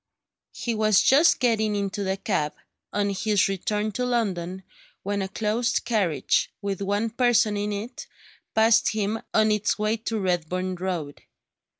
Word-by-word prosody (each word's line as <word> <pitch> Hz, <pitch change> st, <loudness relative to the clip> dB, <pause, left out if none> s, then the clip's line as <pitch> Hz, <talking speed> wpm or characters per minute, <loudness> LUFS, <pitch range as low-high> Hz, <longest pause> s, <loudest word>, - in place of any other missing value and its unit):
He 235 Hz, -, -2 dB
was 215 Hz, -2 st, +3 dB
just 305 Hz, +5 st, +5 dB
getting 220 Hz, -4 st, +1 dB
into 200 Hz, 0 st, -2 dB
the 190 Hz, 0 st, -1 dB
cab, 155 Hz, -7 st, -1 dB, 0.4 s
on 205 Hz, -1 st, 0 dB
his 205 Hz, +1 st, +1 dB
return 210 Hz, +2 st, -2 dB
to 250 Hz, -, -3 dB
London, 190 Hz, -7 st, -1 dB, 0.4 s
when 200 Hz, +1 st, -1 dB
a 190 Hz, -, -2 dB
closed 220 Hz, +4 st, -1 dB
carriage, 200 Hz, -10 st, +1 dB
with 200 Hz, -2 st, -4 dB
one 205 Hz, +3 st, -1 dB
person 235 Hz, -3 st, +3 dB
in 205 Hz, +1 st, -2 dB
it, 215 Hz, +5 st, -6 dB, 0.5 s
passed 225 Hz, 0 st, +4 dB
him 215 Hz, +1 st, -1 dB
on 215 Hz, 0 st, +3 dB
its 210 Hz, 0 st, +1 dB
way 215 Hz, +1 st, 0 dB
to 225 Hz, 0 st, -3 dB
Redburn 185 Hz, 0 st, -1 dB
Road. 175 Hz, -5 st, -4 dB
210 Hz, 150 wpm, -25 LUFS, 190-220 Hz, 0.5 s, just